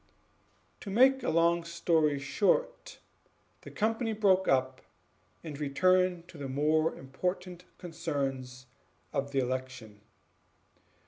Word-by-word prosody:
To - - -8
make 260 +6 +4
a - - -1
long 170 +1 +2
story 165 -3 +1
short, 210 - -1 0.6
the - - -11
company 225 +1 -1
broke 195 -3 +2
up 130 -1 +1 0.6
and 150 -3 -7
returned 180 +4 +1
to 160 - -12
the 140 -2 -5
more 155 +4 +1
important 180 +6 -5
concerns 135 -7 -4 0.5
of 140 +1 -1
the 140 - -4
election. 130 -4 -4
160 Hz, 110 wpm, -30 LUFS, 135-185 Hz, 0.6 s, make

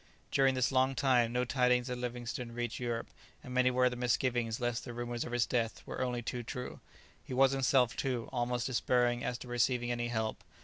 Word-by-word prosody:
During 135 -1 +4
this 130 0 +2
long 130 0 +3
time 120 -2 +3
no 125 +1 +1
tidings 125 -1 +2
of 125 -1 -3
Livingstone 120 0 -4
reached 120 -1 -3
Europe, 120 -2 -3 0.3
and 125 - -8
many 125 0 +4
were 125 0 +3
the 125 - -1
misgivings 120 -2 0
lest 120 -1 -1
the 120 - -7
rumours 120 0 -3
of - - -6
his 120 -1 +2
death 115 -3 -1
were - - -5
only 125 -1 -1
too 120 +1 -3
true. 125 +2 -6 0.4
He 130 - -6
was 135 +1 +5
himself, 130 -2 +3
too, 125 -4 -2
almost 120 -1 0
despairing 125 -1 +1
as 125 - -2
to 125 - -10
receiving 120 0 +1
any 120 0 -1
help. 110 -2 -2
125 Hz, 205 wpm, -33 LUFS, 120-125 Hz, 0.4 s, was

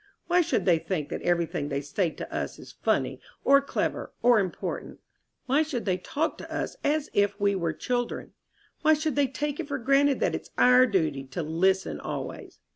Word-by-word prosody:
Why 350 +1 +4
should 335 0 0
they 170 -4 +4
think 160 -4 -3
that - - -4
everything 170 -4 0
they 140 -1 -1
say 155 +5 0
to - - -8
us - - -3
is - - -12
funny - - -1 0.2
or 280 0 +6
clever 280 - -2
or 240 -2 +6
important? 185 -4 -4 0.5
Why 275 +4 +3
should 295 -7 -2
they 185 -2 0
talk 310 - -2
to - - -9
us - - -3
as 300 0 0
if 205 0 +2
we 200 0 +3
were 170 -4 0
children? 245 +9 -3 0.5
Why 315 0 +5
should 310 -1 -2
they 285 -1 +3
take 290 +3 -3
it 325 - -3
for 280 -1 -2
granted 275 +2 +3
that - - +2
it's - - -5
our 250 +1 +6
duty 155 - 0
to 135 +6 -4
listen 185 +5 +1
always?" - - -6
230 Hz, 195 wpm, -27 LUFS, 175-285 Hz, 0.5 s, or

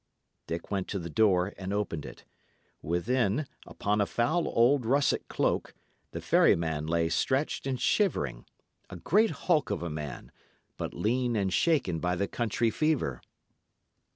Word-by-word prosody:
Dick 85 +4 -5
went 95 -2 -1
to 100 - -3
the 85 -3 -6
door 95 0 +3
and 95 0 -4
opened 100 -7 -2
it. - - -12 0.6
Within, 110 - 0 0.2
upon 105 +1 -1
a 100 - +1
foul 155 +9 0
old 125 +3 +3
russet 140 +5 +1
cloak, - - -1 0.3
the - - -6
ferryman 80 -2 +2
lay 85 0 +1
stretched 130 - 0
and 130 -2 -2
shivering; 70 - 0 0.4
a - - -8
great 205 - +2 0.2
hulk 160 -6 +2
of 85 - -2
a 85 - -3
man, 75 -1 -6 0.4
but - - -5
lean 120 +2 0
and 95 -3 0
shaken 135 - +2
by 90 +2 0
the 100 +3 -1
country 115 0 0
fever. 140 - 0
100 Hz, 150 wpm, -29 LUFS, 85-130 Hz, 0.6 s, door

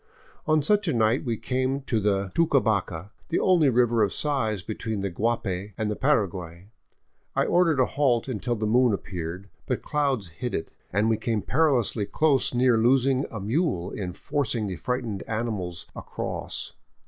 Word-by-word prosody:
On 155 -1 +3
such 205 +4 +2
a 160 - +2
night 115 +3 +2
we 120 -5 -2
came 130 +3 -1
to 125 -5 -1
the 100 -2 0
Tucabaca, 110 - +1 0.2
the 170 - +1
only 170 -6 +4
river 120 -2 +3
of 100 -3 +3
size 115 -10 -1
between 110 0 -4
the 100 -1 -2
Guapay 100 -1 -2
and 105 -1 -1
the - - -2
Paraguay. 95 - -1 0.7
I - - +2
ordered 170 -5 +3
a 130 - +5
halt 130 -5 +1
until 120 -1 -2
the 110 -1 -2
moon 120 +1 +4
appeared, 90 0 -5 0.2
but - - -2
clouds 135 -10 0
hid 120 +9 -4
it, 80 - -4 0.2
and 100 +3 +2
we 110 -1 +2
came 115 -4 -1
perilously 125 -8 +2 0.5
near 125 -2 +4
losing 130 +3 +3
a 110 - -6
mule 105 - -1
in 90 -3 -4
forcing 120 -4 -1
the 95 -2 -3
frightened 120 -3 -3
animals 105 -6 -3
across. - - -5
115 Hz, 160 wpm, -26 LUFS, 100-135 Hz, 0.7 s, a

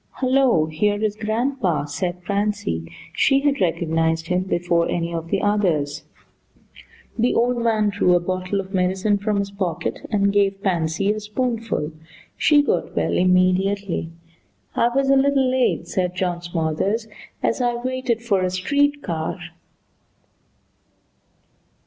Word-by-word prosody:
"Hello, 255 - +3
here 205 +7 0
is 210 -1 0
grandpa," 220 - -1
said 175 +4 -4
Pansy. 200 - -2 0.2
She 270 0 +3
had 285 -4 +1
recognized 165 -2 0
him 180 0 +2
before 175 -2 0
any 170 0 -2
of 165 0 -4
the - - 0
others. 155 -8 0 1.1
The 240 +2 +2
old 245 +1 +2
man 220 -2 +2
drew 185 -3 +3
a - - +4
bottle 185 +2 -2
of 195 0 -6
medicine 190 +2 +1
from 210 0 -1
his 200 0 -2
pocket 185 -5 -3
and 200 -2 +2
gave 195 -1 +1
Pansy 175 0 0
a 215 - -4
spoonful. 225 -6 -2 0.4
She 295 -1 +4
got - - -1
well - - 0
immediately. 185 0 +2 0.7
"I 235 - +3
was 270 +2 +1
a - - +6
little 270 -1 +3
late," 255 -1 +1
said 180 -2 -1
John 180 -1 -1
Smothers, 175 +6 -1 0.4
"as 230 - +1
I 240 -1 +1
waited 250 -1 -2
for 200 -5 +1
a 185 - +1
street 285 +11 0
car." 165 0 -3
200 Hz, 135 wpm, -22 LUFS, 175-230 Hz, 1.1 s, a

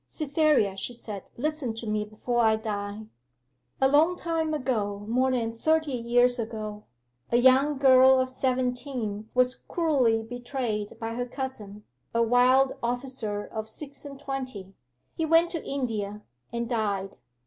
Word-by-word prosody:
'Cytherea,' 290 - +1
she 245 - -4
said, 210 -4 -7
'listen 290 -3 -2
to 225 - -7
me 210 -1 0
before 220 +3 -2
I 220 -1 +4
die. 210 -1 -4 0.7
'A 265 - +5
long 310 +6 +4
time 330 -2 -1
ago 215 -8 -2
more 255 +3 +2
than 230 -3 -1
thirty 315 +4 +1
years 245 0 +2
ago 215 -2 -5 0.5
a 235 - +4
young 265 +4 +5
girl 260 -1 +6
of 260 - +1
seventeen 250 -4 -2
was 250 0 +4
cruelly 260 -12 +1
betrayed 240 -3 -4
by 225 0 -4
her 245 +1 -3
cousin, 220 -6 -6 0.3
a 230 - +4
wild 255 +3 +4
officer 240 -4 -3
of 220 -1 -6
six 280 +4 -7
and 280 -2 -9
twenty. 260 -9 -5 0.4
He 325 - -3
went 330 +2 +4
to 330 - -4
India, 210 -6 -3 0.3
and 235 0 -2
died. 205 -5 -1
245 Hz, 145 wpm, -27 LUFS, 220-270 Hz, 0.7 s, girl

